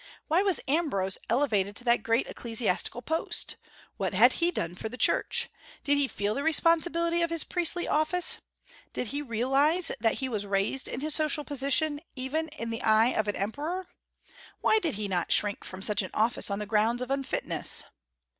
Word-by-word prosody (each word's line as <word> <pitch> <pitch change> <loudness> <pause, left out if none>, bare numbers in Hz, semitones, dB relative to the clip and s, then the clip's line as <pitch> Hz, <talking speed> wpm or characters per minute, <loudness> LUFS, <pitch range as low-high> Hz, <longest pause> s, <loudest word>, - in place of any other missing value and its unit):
Why 330 +4 +3
was 390 -3 +2
Ambrose 265 - 0
elevated 210 -6 +1
to 245 - -3
that 235 -2 +2
great 230 +3 +1
ecclesiastical 230 0 -1
post? 320 +6 -1 0.4
What - - -2
had - - +6
he 340 - +4
done 170 - -3
for 220 +5 -6
the 250 - -8
Church? - - +2 0.4
Did 285 - +3
he 285 -1 +2
feel 205 -4 -2
the 280 - -3
responsibility 335 +2 +2
of 335 - +1
his 330 -2 0
priestly 350 0 -1
office? 315 +4 +2 0.5
Did 245 - -3
he 285 +5 -2
realize 275 +7 +2
that 225 0 +1
he 265 - -3
was 215 -5 -2
raised 200 +7 0
in 250 - -5
his 305 +1 -2
social 305 -1 +2
position, 290 +2 +2
even 280 +5 -2
in 260 -7 -6
the 225 - -4
eye 220 +2 +4
of 215 -4 -1
an 205 - -1
emperor? 300 - -3 0.7
Why 440 - +3
did 330 - -2
he 210 0 -3
not 180 -3 -1
shrink 205 0 +1
from 190 0 -8
such 210 -1 +2
an 185 - -6
office, 225 +1 +2
on 200 - -2
the 210 - -4
grounds 225 +4 +1
of 250 - -7
unfitness? 275 -1 -1
265 Hz, 185 wpm, -28 LUFS, 215-315 Hz, 0.7 s, had